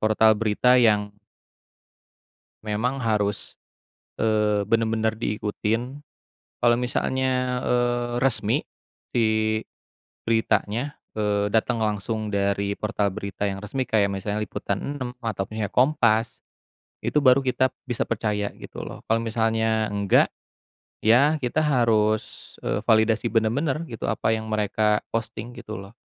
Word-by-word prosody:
portal 110 0 +4
berita 115 +4 +3
yang 105 -3 +3 1.5
memang 110 +5 -1
harus, 105 -4 -1 0.6
eee, 105 -2 +1
bener-bener 110 +1 +1
diikutin. 115 +5 -2 0.6
Kalau 120 -1 +4
misalnya, 125 +1 0
eee, 120 0 +1
resmi 135 -2 +2 0.6
si 110 -1 +2 0.6
beritanya, 115 +4 0 0.2
eee, 105 -1 0
dateng 115 0 +1
langsung 105 +1 -2
dari 100 0 0
portal 105 -2 0
berita 100 -1 -5
yang 95 -1 -2
resmi 120 +6 -3
kayak 110 -5 +2
misalnya 100 +2 -3
Liputan 100 -2 -3 0.2
6 125 -3 -4
atau 110 -4 -2
punya 110 0 -4
Kompas, 120 -4 +2 0.6
itu - - -3
baru 130 +1 +6
kita 130 0 +1 0.2
bisa 120 - -1
percaya 105 -2 -2
gitu - - -9
loh. - - -9
Kalau 115 +1 +2
misalnya 110 -1 +1
enggak, 100 -1 +3 0.7
ya 140 +8 +4
kita 145 +5 0
harus, 110 -6 +1
eee, - - -1
validasi 110 +1 +3
bener-bener 135 +7 +1
gitu 115 - -5
apa 110 - 0
yang 110 - -6
mereka 105 0 +1
posting 115 +1 -5
gitu 110 -4 -7
loh. 100 +2 -13
110 Hz, 120 wpm, -24 LUFS, 105-120 Hz, 1.5 s, baru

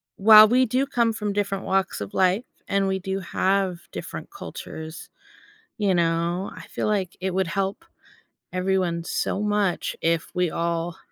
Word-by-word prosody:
while 215 +1 +9
we 255 +3 +4
do 255 +3 +1
come 235 -4 +1
from 210 -2 -3
different 200 -1 -2
walks 190 - 0
of 100 -1 -6
life, 190 +4 +2 0.2
and 200 0 +1
we 190 0 0
do 190 +1 -3
have 190 -1 0
different - - -7
cultures, 160 +1 -8 0.7
you 205 -4 +2
know, 170 +2 0
I - - -11
feel - - -3
like 195 -5 -1
it 190 0 -1
would 190 -1 +1
help 195 - -2 0.7
everyone 185 -2 0
so 195 - -1
much 205 -3 0
if 165 0 +1
we 180 -2 +1
all 170 0 -2
190 Hz, 155 wpm, -24 LUFS, 175-205 Hz, 0.7 s, while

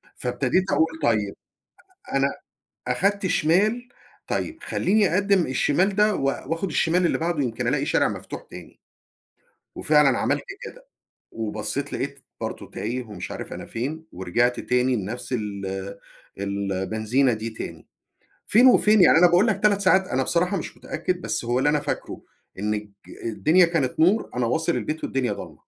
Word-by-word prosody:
فابتديت 185 - 0
أقول 160 0 +1
طيّب 105 -3 +1 0.8
أنا 135 0 +3 0.6
أخدت 200 - +1
شمال، 210 +10 +2 0.4
طيّب 320 +1 -3
خلّيني 200 -2 +1
أقدّم 200 -2 +3
الشمال 175 +9 +1
ده 210 0 +4
و 135 - -2
وآخُد 165 +6 -2
الشمال 175 +2 +2
اللي - - 0
بعده 165 -3 -1
يمكن 115 -3 -2
ألاقي - - 0
شارع - - +2
مفتوح - - -7
تاني. - - -12 1.0
وفعلًا 150 -3 +4
عملت 145 +1 0 0.2
كده، - - -11 0.5
وبصيت 110 +6 -4
لقيت 140 +1 -4 0.2
برضه - - -5
تايه 125 +4 -3
ومش 105 -6 -8
عارف - - -6
أنا - - -7
فين 150 +8 -5
ورجعت 120 +7 0
تاني 125 +1 +1
لنفْس 110 +5 -5
ال 100 -3 -4 0.4
البنزينة 100 +6 0
دي 110 +1 -4
تاني. 110 - -8 0.6
فين 240 +5 +5
وفين 215 -5 +6
يعني 165 - +7
أنا 180 - +7
باقول 180 +6 +4
لك 200 -2 0
3 205 -1 +4
ساعات، 190 -1 +3
أنا 130 +1 0
بصراحة 180 +7 +1
مش 165 - -6
متأكد، 180 +3 -3
بس 110 +2 -2
هو 120 +2 0
اللي 145 +3 +3
أنا 150 -1 +1
فاكره - - -5 0.4
إن 105 +1 -1
الج 105 -1 -5 0.3
الدنيا 160 +10 +3
كانت 165 -2 -1
نور، 190 +7 +3
أنا 120 -1 +1
واصل 160 +7 0
البيت 155 +1 -3
والدنيا 130 -2 -1
ضلمة. - - -8
145 Hz, 155 wpm, -24 LUFS, 115-180 Hz, 1.0 s, يعني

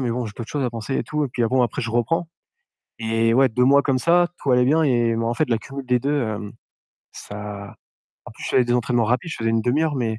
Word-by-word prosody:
mais 125 -3 -1
bon, 120 +1 -2
j'ai 105 - -8
d'autres 115 - -7
choses 145 -3 -2
à 125 - -1
penser 115 +3 -4
et - - 0
tout» 150 -1 -1
et - - -3
puis 120 -1 -1
bon 125 +2 +2
après 120 +4 -2
je 115 - -3
reprends 160 +9 0 0.7
et 115 0 +1
ouais, 135 0 +5
2 125 +3 +1
mois 140 +2 +5
comme 135 -2 +1
ça, 175 +4 +3
tout 140 - -1
allait 125 0 +4
bien 160 +3 +3
et 120 -5 +2
bon 115 0 -1
en 120 - -1
fait 145 0 -1
l'accumulation 135 +4 -4
des 125 0 +2
2, 140 +1 0
hem, 105 -2 -4 0.6
ça 105 -1 -8 0.5
en - - -8
plus - - -11
je - - -3
faisais 125 - +4
des 120 0 0
entraînements 120 -1 +1
rapides, 125 +9 -1
je - - -5
faisais 115 0 0
1/2 120 +7 +1
heure, 155 -3 0
mais 110 -3 -2
125 Hz, 265 wpm, -22 LUFS, 115-140 Hz, 0.7 s, ouais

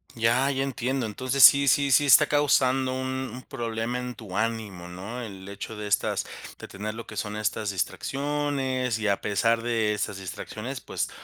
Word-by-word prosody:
Ya, 120 +4 +2
ya 135 -1 0
entiendo. 130 -1 -2
Entonces 130 +5 +1
sí, 140 0 +8
sí, 140 +2 +3
sí 145 - +5
está 150 +2 +8
causando 135 -3 +2
un 130 0 -3
un 125 +1 -9
problema 120 -2 -3
en 125 -1 -5
tu 100 -5 -9
ánimo, 105 -5 -2
¿no? 100 +8 -7
El 95 -4 -8
hecho 100 +2 -7
de 105 - -5
estas 100 - 0 0.3
de - - -9
tener 105 +3 -6
lo 115 - -7
que - - -10
son 105 0 -3
estas 110 0 -1
distracciones, 135 +4 -1
y 110 -1 -2
a 100 -1 +1
pesar 115 +3 +1
de 115 -3 +1
estas 105 -1 -3
distracciones, 110 +6 -6
pues - - -3
115 Hz, 180 wpm, -26 LUFS, 105-130 Hz, 0.3 s, sí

